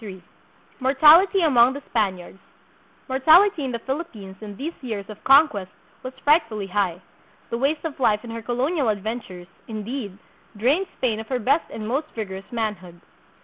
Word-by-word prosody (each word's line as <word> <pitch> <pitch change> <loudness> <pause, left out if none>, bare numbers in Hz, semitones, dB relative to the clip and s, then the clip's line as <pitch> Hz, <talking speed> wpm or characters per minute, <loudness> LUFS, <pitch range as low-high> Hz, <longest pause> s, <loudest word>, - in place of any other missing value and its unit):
171 190 -4 -11 0.5
Mortality 310 +9 +6
among 255 -4 +5
the 285 - -7
Spaniards. 195 -4 -2 0.7
Mortality 315 +7 +4
in 265 - -3
the 235 - -2
Phil* 270 +7 -3
ippines 200 - -13
in 205 -2 -9
these 315 +7 -4
years 220 -6 -5
of 210 - -11
conquest 270 -9 +4 0.3
was 255 - -6
frightfully 230 - +2
high. 190 -3 -1 0.5
The 235 - -2
waste 295 +5 0
of 295 -3 -5
life 215 -5 +2
in 235 - -8
her 230 0 -6
colonial 255 +4 -1
adventures, 205 -3 -5 0.2
indeed, 215 -2 -6 0.4
drained 285 - +1
Spain 225 -4 -1
of 220 - -8
her 260 - -1
best 275 +7 +1
and 215 -1 -6
most 275 +7 -1
vigorous 195 -1 -6
manhood. 205 -7 -4
235 Hz, 160 wpm, -23 LUFS, 205-280 Hz, 0.7 s, Mortality